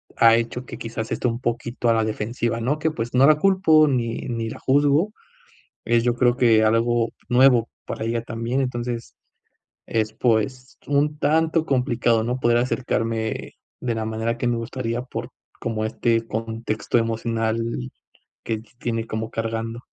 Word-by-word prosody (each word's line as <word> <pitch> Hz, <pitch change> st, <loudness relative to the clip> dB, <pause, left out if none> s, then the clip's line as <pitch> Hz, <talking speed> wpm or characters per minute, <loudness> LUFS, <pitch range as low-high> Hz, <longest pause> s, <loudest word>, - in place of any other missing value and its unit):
ha 115 Hz, -1 st, +6 dB
hecho 120 Hz, +2 st, -2 dB
que -, -, -8 dB
quizás 115 Hz, -1 st, -5 dB
esté 125 Hz, -, 0 dB
un 115 Hz, 0 st, -2 dB
poquito 120 Hz, 0 st, -1 dB
a 115 Hz, -, +5 dB
la 115 Hz, -1 st, +2 dB
defensiva, 115 Hz, +2 st, -2 dB
¿no? 140 Hz, +6 st, 0 dB
Que, 160 Hz, +1 st, 0 dB
pues 120 Hz, -4 st, -4 dB
no 130 Hz, +2 st, +6 dB
la 155 Hz, -, +7 dB
culpo, 160 Hz, -5 st, +5 dB
ni 120 Hz, -4 st, 0 dB
ni 115 Hz, -1 st, -2 dB
la -, -, -8 dB
juzgo. 145 Hz, +8 st, +3 dB, 0.7 s
Eh, 120 Hz, 0 st, +3 dB
yo 120 Hz, +1 st, +2 dB
creo 120 Hz, 0 st, +3 dB
que 115 Hz, -3 st, +5 dB
algo 115 Hz, +1 st, +2 dB, 0.2 s
nuevo 125 Hz, -2 st, +5 dB, 0.2 s
para 110 Hz, -, -4 dB
ella 115 Hz, 0 st, -1 dB
también, 115 Hz, +3 st, -2 dB
entonces 120 Hz, -2 st, -4 dB, 0.7 s
es 110 Hz, -1 st, -1 dB
pues 120 Hz, +3 st, -1 dB
un 145 Hz, +1 st, +1 dB
tanto 160 Hz, +2 st, +2 dB
complicado, 120 Hz, -4 st, +1 dB
¿no? 125 Hz, +2 st, -1 dB
Poder 120 Hz, -1 st, +3 dB
acercarme 115 Hz, -3 st, -1 dB, 0.3 s
de 120 Hz, -2 st, -2 dB
la 110 Hz, -, -2 dB
manera 110 Hz, +1 st, -2 dB
que 125 Hz, -, -1 dB
me 120 Hz, -1 st, +1 dB
gustaría, 115 Hz, 0 st, -3 dB
por 120 Hz, -1 st, -6 dB, 0.3 s
como 110 Hz, -1 st, -2 dB
este 115 Hz, +1 st, 0 dB
contexto 115 Hz, 0 st, -2 dB
emocional 115 Hz, 0 st, 0 dB, 0.9 s
que 110 Hz, -, -1 dB, 0.2 s
tiene 115 Hz, -2 st, -2 dB
como 110 Hz, +1 st, -3 dB
cargando. 115 Hz, +1 st, -3 dB
115 Hz, 160 wpm, -23 LUFS, 115-125 Hz, 0.9 s, la